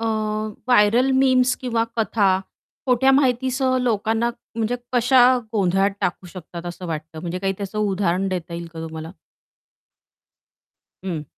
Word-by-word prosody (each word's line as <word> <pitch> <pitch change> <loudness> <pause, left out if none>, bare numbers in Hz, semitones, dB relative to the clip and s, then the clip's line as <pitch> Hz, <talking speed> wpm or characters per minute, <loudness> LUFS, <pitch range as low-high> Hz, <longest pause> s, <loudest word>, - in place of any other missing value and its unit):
अ, 230 - -3 0.6
viral 245 +3 +4
memes 260 -1 +3
किंवा 230 -3 -1
कथा 215 -2 +2 0.6
खोट्या 255 +1 +4
माहितीसह 260 -1 +2
लोकांना, 225 0 0 0.3
म्हणजे 230 +2 0 0.2
कशा 250 +1 +4 0.3
गोंधळात 195 -1 +2
टाकू 180 +1 -2
शकतात 175 -1 -9
असं 175 +1 -7
वाटतं 160 0 -6
म्हणजे 175 +1 -4
काही 195 0 -1
त्याचं 200 +1 -5
उदाहरण 195 -2 0
देता 175 -2 -4
येईल 170 0 -5
का 165 - -8
तुम्हाला? 160 0 -7 1.9
हं. 165 -5 -3
205 Hz, 125 wpm, -22 LUFS, 175-245 Hz, 1.9 s, viral